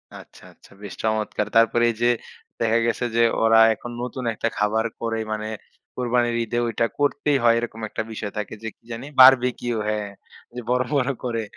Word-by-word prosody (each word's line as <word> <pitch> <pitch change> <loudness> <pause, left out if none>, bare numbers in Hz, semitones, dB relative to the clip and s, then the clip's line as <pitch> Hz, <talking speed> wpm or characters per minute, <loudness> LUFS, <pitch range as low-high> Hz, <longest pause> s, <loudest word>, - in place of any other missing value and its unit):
আচ্ছা, - - -14
আচ্ছা, - - -22
বেশ 100 - -7
চমৎকার। 110 -1 -1
তারপরে 115 +1 +4
এই - - -9
যে, 120 - +4 0.5
দেখা 115 0 +2
গেছে 120 +1 -1
যে, 115 - +3 0.2
ওরা 115 0 +5
এখন 120 +2 -9
নতুন 125 +1 -5
একটা 110 - -2
খাবার 110 +2 +1 0.2
করে 115 -1 -2
মানে 110 0 -3 0.5
কোরবানির 120 -1 0
ঈদে 115 +1 -3
ঐটা 115 0 0
করতেই 145 0 +1
হয়। 115 -1 +5
এরকম 115 -1 -6
একটা 110 - -3
বিষয় 105 -2 -5
থাকে, 105 0 -4
যে, 110 - -4
কি - - -51
জানি? 115 +3 -6
বারবিকিউ, 125 -2 +6
হ্যাঁ। 105 -1 -2 0.5
যে, 125 - -4
বড়, 125 0 +2
বড় 140 -1 +1
করে। 115 -3 -2
115 Hz, 180 wpm, -23 LUFS, 110-125 Hz, 0.5 s, বারবিকিউ